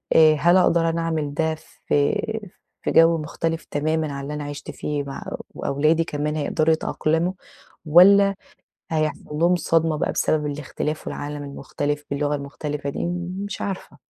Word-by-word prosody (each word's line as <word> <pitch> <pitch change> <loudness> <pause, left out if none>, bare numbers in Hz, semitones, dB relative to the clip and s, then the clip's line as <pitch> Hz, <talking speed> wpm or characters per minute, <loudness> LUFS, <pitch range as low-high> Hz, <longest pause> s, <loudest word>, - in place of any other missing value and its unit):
آآ 155 -1 +7
هل 175 +4 +4
أقدر 170 -2 +3
أنا 165 0 -1
أعمل 160 -3 -2
ده 160 +1 0 0.3
في - - -19 0.9
في - - 0
جو 165 0 +6
مُختلف 165 +1 -3
تمامًا 155 0 0
عن 140 0 -5
اللي 145 +2 -5
أنا 150 0 -4
عِشت 145 0 -6
فيه 145 -1 -3
مع 135 -1 -7 0.3
أو - - -6
أولادي 155 +4 +2
كمان 150 0 -2
هيقدروا 155 +1 +2
يتأقلموا، 160 +2 0 0.5
والّا 195 +5 +7 0.6
هيحصل 155 -1 0 0.2
لهم 175 +2 +4
صدمة 165 -2 +1
بقى - - 0
بسبب 150 -1 +1
الاختلاف 150 +1 -4
والعالم 145 0 -5
المختلف 145 +1 -4
باللغة 145 +1 0
المُختلفة 145 0 -4
دي؟ 140 - -3
م 175 +1 -3
مش 205 - -6
عارفة. 195 -2 -5
155 Hz, 155 wpm, -23 LUFS, 145-165 Hz, 0.9 s, آآ